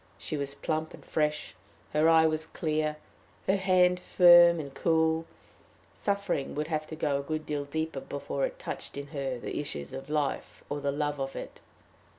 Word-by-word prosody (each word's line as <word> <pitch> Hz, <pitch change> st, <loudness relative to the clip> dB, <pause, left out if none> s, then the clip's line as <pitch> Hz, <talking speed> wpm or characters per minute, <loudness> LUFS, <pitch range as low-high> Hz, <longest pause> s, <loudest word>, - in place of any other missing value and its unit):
She 155 Hz, -, -5 dB
was 140 Hz, -1 st, -1 dB
plump 155 Hz, +2 st, -2 dB
and -, -, -18 dB
fresh; 150 Hz, -1 st, -1 dB, 0.4 s
her 155 Hz, +2 st, +4 dB
eye 160 Hz, 0 st, +6 dB
was 160 Hz, 0 st, 0 dB
clear, 155 Hz, -2 st, -1 dB, 0.5 s
her 195 Hz, -, +3 dB
hand 180 Hz, -2 st, +3 dB
firm 175 Hz, -2 st, +7 dB
and 140 Hz, -3 st, -6 dB
cool; 160 Hz, +1 st, +1 dB, 0.7 s
suffering 200 Hz, -8 st, -1 dB
would 150 Hz, +2 st, -2 dB
have 155 Hz, -1 st, -2 dB
to 160 Hz, -, -7 dB
go 145 Hz, -3 st, 0 dB
a -, -, -2 dB
good 155 Hz, +2 st, -4 dB
deal 145 Hz, -1 st, -2 dB
deeper 160 Hz, 0 st, -3 dB
before 140 Hz, 0 st, -4 dB
it -, -, -11 dB
touched -, -, -6 dB
in 140 Hz, 0 st, -6 dB
her 135 Hz, -4 st, -3 dB
the 120 Hz, -, -4 dB
issues 70 Hz, -, -5 dB
of 135 Hz, +2 st, -7 dB
life, 150 Hz, -2 st, -2 dB
or 145 Hz, 0 st, -2 dB
the 140 Hz, -, 0 dB
love 145 Hz, 0 st, -2 dB
of 135 Hz, 0 st, -3 dB
it. -, -, -7 dB
155 Hz, 180 wpm, -29 LUFS, 140-160 Hz, 0.7 s, firm